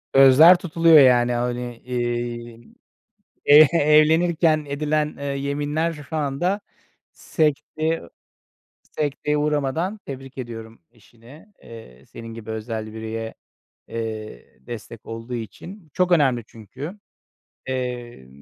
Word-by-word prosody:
Sözler 140 +7 +8
tutuluyor, 165 -2 +5
yani, 125 -2 +5
hani, 120 0 -3
eee, 120 -1 -4 0.9
e 145 - +7 0.2
evlenirken 155 +1 +3
edilen, 150 +1 -1
eee, 140 - -6
yeminler 145 +4 -2
şu 150 0 -7
anda 155 +8 -1 0.5
sekteye 155 +1 -1 0.8
sekteye 150 0 -2
uğramadan 150 +7 -1
Tebrik 135 -1 -9
ediyorum 115 -3 -8
eşini, 120 - -18 0.2
eee, 70 - -13
senin 115 - -11
gibi 115 -1 -8
özel 110 -1 -5
bireye, 110 0 -5 0.6
eee, 110 - -7
destek 115 -1 -9
olduğu 115 +2 -7
için. 165 - -8
Bu 150 - -28
çok 180 -1 +1
önemli 130 -8 +3
çünkü. 130 - -9 0.7
Eee, 125 - -5
135 Hz, 105 wpm, -22 LUFS, 115-155 Hz, 0.9 s, Sözler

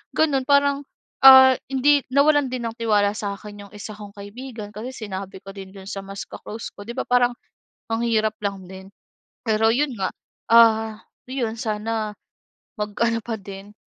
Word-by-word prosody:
gano'n 275 -5 +2
parang, 280 0 +3 0.4
ah, 265 0 +10 0.2
hindi 280 +2 +3
nawalan 285 0 +3
din 250 -2 -4
ng 225 - -5
tiwala 210 -3 +2
sa'kin 205 0 -6
'yong 200 - -18
isa 215 +1 -7
kong 205 -1 -11
kaibigan 215 +1 -8
kasi 220 +5 -6 0.2
sinabi 190 0 -6
ko 195 - -9
din 195 -1 -9
'yon 190 -1 -11
sa 195 - -5
mas 195 0 -7
ka-close 220 +1 -8
ko. - - -11
'Di 235 - -5
ba - - -1
parang 245 -1 +2 0.6
ang 225 - 0
hirap 220 -1 +1
lang 195 -2 -3
din. 190 0 -10 0.6
Pero 220 0 +2
'yon 290 +2 +1
nga, 190 - -1 0.4
ah, 220 -1 +5 0.3
'yon 240 -4 -3
sana 215 -1 -2 0.6
mag-ano 225 +2 0
pa 230 -2 -3
din, 195 +1 -10
220 Hz, 165 wpm, -23 LUFS, 205-255 Hz, 0.6 s, ah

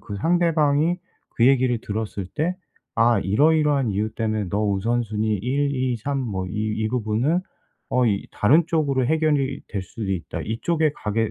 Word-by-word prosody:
그 100 -2 -7
상대방이 165 - +2 0.4
그 120 - +4
얘기를 130 -3 +3
들었을 105 -2 -4
때 170 +4 -1 0.4
"아 115 -2 +4
이러이러한 145 - +2
이유 105 +2 -1
때문에 110 -3 -1
너 105 +1 0
우선 115 +5 0
순위 110 0 -1
1, 140 +7 0
2, 130 -2 0
3 140 +5 -3
뭐 95 -7 -3
이 - - -7 0.3
이 - - +1
부분은 125 - 0 0.5
어 125 -1 +2
이 100 -3 0
다른 150 +11 +4
쪽으로 140 -6 +1
해결이 145 -3 +1
될 100 - -3
수도 100 +2 -6
있다. 85 -4 -4
이쪽에 155 +8 0
가게 110 +1 -1
120 Hz, 290 characters per minute, -23 LUFS, 105-145 Hz, 0.5 s, 그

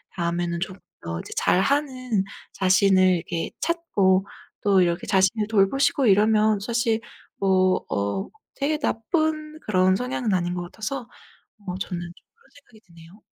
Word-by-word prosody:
다음에는 170 0 -1
조금 185 +1 -5 0.2
더 85 0 -5
이제 - - -9
잘하는 255 -1 +1 0.3
자신을 190 -1 +4
이렇게 165 0 -4
찾고 200 - +1 0.3
또 195 -2 +4
이렇게 170 -1 0
자신을 195 +2 +2
돌보시고 225 +6 +2
이러면 215 +1 +4
사실 230 +1 0 0.4
뭐 185 -1 +2
어 100 - -2 0.3
되게 295 +2 0
나쁜 310 +3 -1
그런 185 -2 +3
성향은 245 -1 -2
아닌 175 -1 0
것 175 0 -3
같아서 220 +9 -5 0.7
어 180 - -3
저는 180 -2 -4
좀 175 0 -7 0.2
그런 465 - -28
생각이 260 -6 -20
드네요. 170 +4 -17
195 Hz, 290 characters per minute, -24 LUFS, 185-240 Hz, 0.7 s, 자신을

